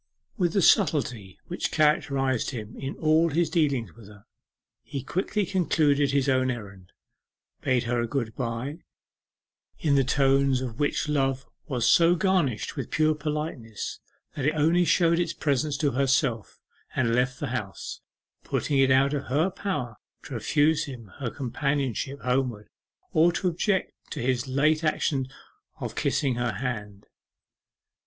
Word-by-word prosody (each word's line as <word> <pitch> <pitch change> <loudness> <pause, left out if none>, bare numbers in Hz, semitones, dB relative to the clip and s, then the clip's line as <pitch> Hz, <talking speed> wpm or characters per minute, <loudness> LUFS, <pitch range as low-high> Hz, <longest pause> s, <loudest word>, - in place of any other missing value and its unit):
With 175 -5 0
the 195 - +2
subtlety 115 - +2
which 175 - -3
characterized 140 -5 +1
him 115 -4 -7
in 135 +1 -5
all 160 +1 +3
his 165 +2 0
dealings 140 - +1
with 110 -2 -15
her, 105 0 -16 0.6
he 140 -3 -6
quickly 200 +2 -1
concluded 155 -6 +2
his 140 0 +1
own 130 -1 +2
errand, 100 -7 -7 0.7
bade 130 -2 +1
her 120 0 0
a 120 - -1
good 115 -3 -3
bye, 125 +5 -4 1.0
in 150 -3 +1
the 135 -1 +4
tones 135 0 +3
of 125 -3 -6
which 145 +1 0
love 135 -2 0 0.2
was 125 -5 0
so 170 +1 +5
garnished 170 - 0
with - - -4
pure 155 0 +2
politeness 150 -7 -4 0.3
that 140 -1 -2
it 155 - +1
only 165 +4 +3
showed 170 -1 +3
its 170 -1 0
presence 145 -1 0
to 145 0 +1
herself, 135 -4 0 0.4
and 115 -3 +1
left 125 +2 +1
the 145 - -3
house 105 -7 -5 0.4
putting 140 -2 0
it 135 0 +5
out 135 +2 +4
of 145 -1 -2
her 155 +9 +1
power 135 - -4 0.3
to - - -9
refuse 150 +2 +2
him 120 -8 -9
her 130 -4 -2
companionship 140 +1 -2
homeward, 125 -4 -1 0.4
or 165 +2 +5
to 185 - -1
object 185 +3 0 0.2
to - - -5
his 125 +1 0
late 150 +4 +2
action 140 -4 0 0.5
of - - -4
kissing 135 -3 +1
her 120 -2 -1
hand. 105 -3 -5
135 Hz, 150 wpm, -26 LUFS, 120-155 Hz, 1.0 s, so